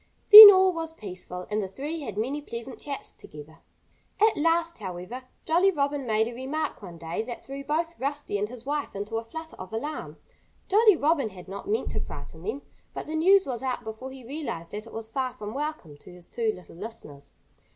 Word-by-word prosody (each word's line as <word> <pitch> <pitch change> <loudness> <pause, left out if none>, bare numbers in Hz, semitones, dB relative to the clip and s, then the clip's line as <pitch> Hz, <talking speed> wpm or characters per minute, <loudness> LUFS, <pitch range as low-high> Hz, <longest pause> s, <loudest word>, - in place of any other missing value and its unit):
Then 425 0 +15
all 375 -1 +4
was 325 -1 -5
peaceful. 180 - -8
And 210 +1 0
the 195 - -3
three 290 - -5
had 220 -9 -7
many 265 +7 -2
pleasant 235 -2 -8
chats 280 -2 -6
together. 150 +2 -13 0.6
At 435 +1 +4
last, 330 0 0
however, 190 +6 -7 0.2
Jolly 350 +5 +3
Robin 285 -5 -1
made 220 0 +2
a 240 - -6
remark 275 +4 -4
one 175 -4 -10
day 165 +4 -4
that 235 +1 -8
threw 275 +1 -7
both 325 +4 -2
Rusty 280 -6 -3
and 210 +1 -2
his 245 -1 -11
wife 290 -3 -3
into 205 +3 -4
a 225 - -3
flutter 320 +8 -9
of 185 0 -9
alarm. 290 +8 -5 0.5
Jolly 425 0 +5
Robin 295 -6 +1
had 185 -2 -13
not 200 - -8
meant 440 +2 -1
to - - -3
frighten 160 - -9
them. 220 +10 -5 0.3
But - - -5
the 310 - -6
news 375 +5 +4
was 250 -3 -4
out 260 -1 -3
before 220 +4 -7
he 265 -1 -11
realized 255 - -6
that 210 +2 -7
it - - -12
was 225 0 -6
far 255 +2 -3
from 210 +1 -7
welcome 285 - -5
to 165 - -15
his 175 -1 -15
two 230 -2 -1
little 180 -4 -13
listeners. 150 -9 -10
255 Hz, 205 wpm, -26 LUFS, 205-310 Hz, 0.6 s, Then